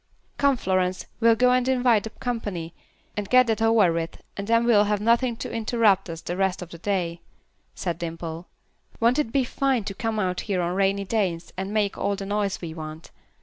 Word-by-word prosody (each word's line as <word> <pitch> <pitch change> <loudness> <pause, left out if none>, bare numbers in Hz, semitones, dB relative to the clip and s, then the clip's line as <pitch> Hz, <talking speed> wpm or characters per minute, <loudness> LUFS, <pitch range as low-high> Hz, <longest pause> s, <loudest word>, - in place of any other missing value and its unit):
"Come, 280 -2 +3
Florence, 185 -2 0
we'll 230 -1 +5
go 250 +2 +4
and 250 0 +2
invite 245 -5 +3
the - - -4
company, 205 -9 -4 0.4
and 205 -1 -4
get 255 0 +6
that 225 -1 -1
over 225 -6 +4
with, 165 0 -4
and 200 0 -5
then 230 +1 +3
we'll 210 -3 +5
have 210 0 0
nothing 235 +3 +2
to - - -6
interrupt 220 -4 +2
us 165 0 -6
the 175 - -4
rest 190 -1 0
of 175 - -12
the 170 - -10
day," 175 -3 -2 0.5
said 175 -2 -3
Dimple. 165 0 -5 0.5
"Won't 235 +5 +3
it 260 -7 0
be 270 +1 +2
fine 260 -1 0
to 200 - -5
come 225 +2 -2
out 185 -3 -1
here 190 -2 +1
on 175 +1 -1
rainy 195 +1 +1
days 185 -5 -1
and 190 +2 -4
make 210 -2 0
all 200 - 0
the 195 - -6
noise 205 -1 -1
we 165 -2 -5
want. 155 0 -8
200 Hz, 205 wpm, -25 LUFS, 180-230 Hz, 0.5 s, get